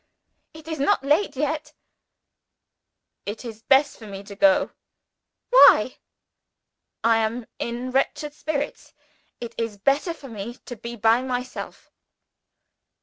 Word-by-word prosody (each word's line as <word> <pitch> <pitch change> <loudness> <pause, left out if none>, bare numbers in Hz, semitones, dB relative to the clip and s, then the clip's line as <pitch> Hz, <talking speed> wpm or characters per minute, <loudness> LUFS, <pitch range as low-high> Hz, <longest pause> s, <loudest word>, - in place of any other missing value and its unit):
"It 315 0 -13
is 320 -2 -4
not 275 -1 +2
late 295 +2 +2
yet. 300 +2 -2 1.5
"It 210 +4 -5
is 225 -2 -8
best 275 +4 +3
for 220 - -10
me 195 -1 -8
to 200 0 -10
go." 290 +5 +4 0.8
"Why?" - - +7 1.1
"I 230 0 +4
am 225 +2 -1
in 240 +2 -4
wretched 295 +3 0
spirits. 295 -1 -4 0.5
It 235 -1 -7
is 225 -3 -3
better 280 - +1
for 280 - -12
me 225 0 -7
to 245 - -7
be 235 +1 -7
by 225 +2 +3
myself." 255 -1 -5
255 Hz, 125 wpm, -24 LUFS, 225-295 Hz, 1.5 s, Why